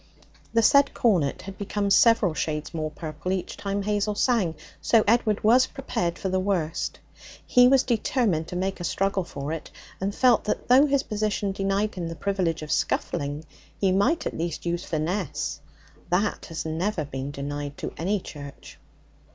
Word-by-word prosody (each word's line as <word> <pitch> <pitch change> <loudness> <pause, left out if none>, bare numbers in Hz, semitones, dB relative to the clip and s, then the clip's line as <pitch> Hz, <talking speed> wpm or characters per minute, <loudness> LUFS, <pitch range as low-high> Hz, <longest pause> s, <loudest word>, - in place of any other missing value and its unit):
The 230 0 +3
said 280 +4 +5
cornet 175 - +1
had 195 0 -9
become 200 0 -1
several 220 -4 +5
shades 150 0 -3
more 155 -1 -2
purple 155 +3 -5
each 190 -1 -2
time 200 0 -3
Hazel 210 0 0
sang, 205 -8 +1 0.3
so 225 -2 +4
Edward 220 -1 +2
was 245 +4 +5
prepared 175 -10 -3
for - - -3
the 185 0 +1
worst. 175 -4 -1 0.5
He 245 -1 +6
was 265 0 +5
determined 225 - 0
to - - -6
make 190 +2 -2
a - - -5
struggle 190 +5 0
for 145 -2 -5
it, 165 - -6 0.3
and 200 +2 -2
felt 250 -3 +4
that 210 - -2
though 265 +4 +7
his 280 -1 +2
position 210 -2 -1
denied 195 +2 0
him 175 -3 -4
the 165 - -5
privilege 180 -5 -1
of 150 - -6
scuffling, 145 +2 -1 0.3
he 195 -2 +2
might 245 - +2
at - - -3
least 165 0 -4
use 170 +1 -1
finesse 165 +2 -2 0.5
that 195 +4 0
has 165 -1 -5
never 160 +1 -1
been 135 -1 -5
denied 145 0 -5
to - - -5
any 195 +5 0
Church. 145 -5 -10
190 Hz, 170 wpm, -25 LUFS, 160-210 Hz, 0.5 s, though